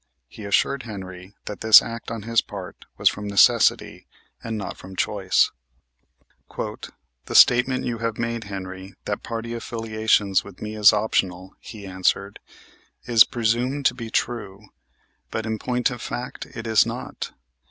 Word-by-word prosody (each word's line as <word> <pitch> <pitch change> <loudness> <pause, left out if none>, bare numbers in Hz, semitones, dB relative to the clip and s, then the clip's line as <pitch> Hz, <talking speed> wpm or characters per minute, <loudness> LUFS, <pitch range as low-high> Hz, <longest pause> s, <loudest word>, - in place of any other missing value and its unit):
He 105 - -11
assured 130 +7 +1
Henry 95 -4 -9
that 105 - -7
this 110 0 +9
act 115 0 -7
on 115 -2 -5
his 115 +1 +2
part - - -9
was - - +2
from 105 - +1
necessity 100 -1 +3 0.4
and 115 -1 -4
not 100 - -5
from 95 0 -12
choice. 95 0 +1 1.1
"The - - -8
statement 130 +2 +5
you 120 -2 -3
have 115 -1 -2
made, 115 -1 -3
Henry, 95 -1 -8
that 105 - -3
party 115 0 -5
affiliations 110 -4 0
with 100 -2 -13
me 110 0 -6
is 105 -2 +7
optional," 95 -3 -1
he 105 -3 -10
answered, 95 +1 -1 0.7
"is 115 -1 +7
presumed 120 +4 -1
to - - +4
be 115 -2 -7
true; 105 -4 -3 0.6
but, 110 - -4
in 110 -1 -3
point 125 +3 0
of 125 -2 -7
fact, 125 - -6
it 115 - -9
is 110 -1 +4
not. - - -6
110 Hz, 150 wpm, -23 LUFS, 100-115 Hz, 1.1 s, this